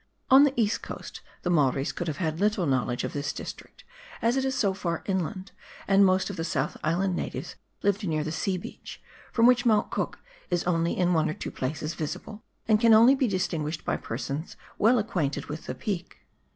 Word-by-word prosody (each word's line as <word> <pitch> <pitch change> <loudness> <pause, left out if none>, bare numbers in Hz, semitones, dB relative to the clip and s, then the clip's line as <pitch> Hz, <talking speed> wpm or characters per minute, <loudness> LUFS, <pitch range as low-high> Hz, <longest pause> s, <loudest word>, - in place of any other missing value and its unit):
On 270 +2 +9
the 280 - +1
East 215 -1 +1
Coast - - -8 0.2
the 180 - 0
Maoris 140 -4 +2
could 175 - -5
have 155 -2 -2
had 160 -3 -2
little 205 -3 +2
knowledge 125 -3 0
of - - -3
this 145 0 -2
district, - - -9 0.4
as 230 +2 +2
it 265 - +1
is 265 0 0
so 195 -2 +2
far 170 -3 -3
inland, 190 0 -2 0.4
and 195 0 +5
most 190 +1 +3
of 200 - -8
the 165 - -2
South 150 -3 -1
Island 175 +4 +1
natives - - -5 0.3
lived 200 0 +1
near 155 -2 0
the 155 - -3
sea 185 +3 -1
beach, 180 - -9 0.3
from 230 - +3
which 245 0 +5
Mount 220 -4 +2
Cook - - -2 0.3
is 175 -2 0
only 170 -1 0
in 180 -1 +2
one 160 -1 +2
or 155 - -3
two - - -6
places 150 +4 -3
visible, 175 +7 -5 0.3
and 215 -1 +4
can 230 -2 +7
only 230 +4 +7
be 265 -2 +1
distinguished 165 -5 -2
by - - +1
persons 140 +7 -5 0.2
well 235 +4 +5
acquainted 180 -10 -1
with 150 +2 -7
the - - -3
peak. 190 -5 -4
180 Hz, 205 wpm, -27 LUFS, 155-210 Hz, 0.4 s, On